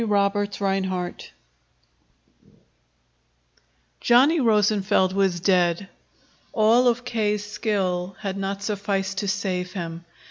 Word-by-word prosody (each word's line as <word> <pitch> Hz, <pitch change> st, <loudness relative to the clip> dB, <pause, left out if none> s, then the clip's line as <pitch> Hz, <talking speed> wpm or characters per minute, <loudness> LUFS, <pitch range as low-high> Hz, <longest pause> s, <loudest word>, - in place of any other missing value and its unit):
CHAPTER 205 Hz, -1 st, +1 dB
XXVIII 195 Hz, -3 st, -3 dB, 2.7 s
Johnny 270 Hz, +7 st, +4 dB
Rosenfeld 210 Hz, -5 st, +2 dB
was 190 Hz, -3 st, +1 dB
dead. 180 Hz, 0 st, +1 dB, 0.6 s
All 230 Hz, +3 st, +4 dB
of 245 Hz, +1 st, +1 dB
K.'s 210 Hz, -3 st, -1 dB
skill 195 Hz, -4 st, -2 dB
had 195 Hz, -2 st, -3 dB
not 195 Hz, 0 st, -4 dB
sufficed 200 Hz, -2 st, -2 dB
to 200 Hz, -, -3 dB
save 185 Hz, -2 st, -2 dB
him. 170 Hz, -2 st, -6 dB
200 Hz, 95 wpm, -24 LUFS, 190-210 Hz, 2.7 s, Johnny